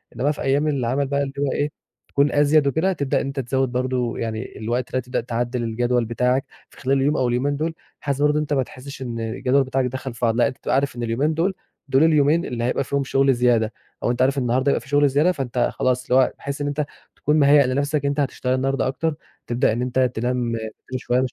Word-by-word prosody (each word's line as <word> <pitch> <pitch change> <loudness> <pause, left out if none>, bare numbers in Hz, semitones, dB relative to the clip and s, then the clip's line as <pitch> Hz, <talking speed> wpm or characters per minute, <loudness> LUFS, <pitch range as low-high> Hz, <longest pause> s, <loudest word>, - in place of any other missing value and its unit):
إنما 145 +3 +1
في 150 - -6
أيام 140 +3 +1
العمل 135 -1 0
بقى 140 0 0
اللي 135 0 -5
هو 140 -1 +1
إيه 145 +1 -1 0.4
تكون 140 +1 +2
أزيَد 145 0 +4
وكده، 160 +7 +1
تبدأ 140 -6 0
إن - - -3
أنت 140 0 -4
تزَود 130 0 0
برضه 125 -1 -1
يعني 110 -1 -4
الوقت 120 +3 -2
ده 130 - +1
هتبدأ 125 0 -2
تعدِّل 120 +1 -2
الجدول 120 +1 0
بتاعك 125 +4 +1 0.2
في - - -21
خلال 135 +1 +2
اليوم 145 +3 +2
أو 130 - +2
اليومين 135 +4 0
دُول 160 +2 -1 0.3
بحيث 140 -1 -2
برضه 150 0 +4
إن 150 - +1
أنت 150 -1 -2
ما 135 -2 +2
تحسش 130 +4 -10
إن 120 -3 -4
الجدول 125 +4 +1
بتاعك 130 0 0
دخل 130 0 -4
في 115 - -13
بعضه، 115 +1 +1
لأ 120 - +4
انت - - -6
تبقى - - -1
عارف 135 -2 0
إن 120 - -4
اليومين 130 +7 0
دول 175 +5 +1 0.3
دول 135 +2 +4
اليومين 160 +1 +3
اللي 120 -1 -3
هيبقى 125 +3 0
فيهم 140 +1 -1
شغل 135 0 +3
زيادة 120 -3 +2 0.3
أو - - +2
أنت 125 - -1
عارف 135 +2 +3
النهارده 130 +2 +1
هيبقى - - 0
في 135 - -15
شغل 145 0 +4
زيادة، 150 +7 +3
فأنت 125 -6 -1
خلاص 125 0 0
اللي 130 +1 +4
هو - - -2
بحيث 140 +1 -5
إن 145 - -1
أنت 145 +1 -1 0.3
تكون 150 +1 +1
مهيأ 140 0 +6
لنفسك 140 +3 0
إن 140 - +2
أنت 145 - -2
هتشتغل 130 -2 0
النهارده 135 0 0
أكتر، 160 +4 -1 0.3
تبدأ 120 0 +2
إن 120 - -2
أنت 125 +1 -1
تنام 125 -1 0
بدري 110 -1 -3 0.3
شويّة 125 0 0
130 Hz, 235 wpm, -22 LUFS, 125-145 Hz, 0.4 s, مهيأ